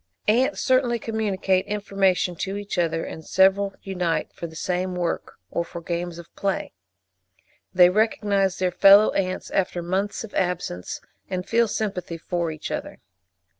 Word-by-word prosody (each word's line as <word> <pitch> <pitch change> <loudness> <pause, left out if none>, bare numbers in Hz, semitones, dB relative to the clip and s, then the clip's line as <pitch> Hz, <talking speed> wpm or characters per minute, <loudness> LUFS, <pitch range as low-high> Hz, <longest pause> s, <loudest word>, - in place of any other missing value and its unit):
Ants 250 +7 +3
certainly 255 -2 +2
communicate 200 -4 0
information 195 -3 +1
to 195 +2 -3
each 205 -2 -4
other, 165 -1 0
and 160 - -8
several 195 +2 +3
unite 180 -4 -2
for 170 - -6
the 160 - -13
same 180 +2 -2
work, 175 -2 -2 0.2
or 170 - 0
for 170 - -8
games 170 0 -4
of 170 -1 -12
play. 195 -1 -2 1.0
They 180 -1 +6
recognise 200 -2 +1
their 185 -1 +1
fellow 200 +4 +7
ants 185 -1 -2
after 180 -2 0
months 195 +5 -1
of 220 - -10
absence, 175 - -2 0.3
and 185 0 -3
feel 235 +1 +3
sympathy 195 -6 -3
for 170 0 -2
each 155 -1 -6
other. - - -5
190 Hz, 150 wpm, -24 LUFS, 175-205 Hz, 1.0 s, fellow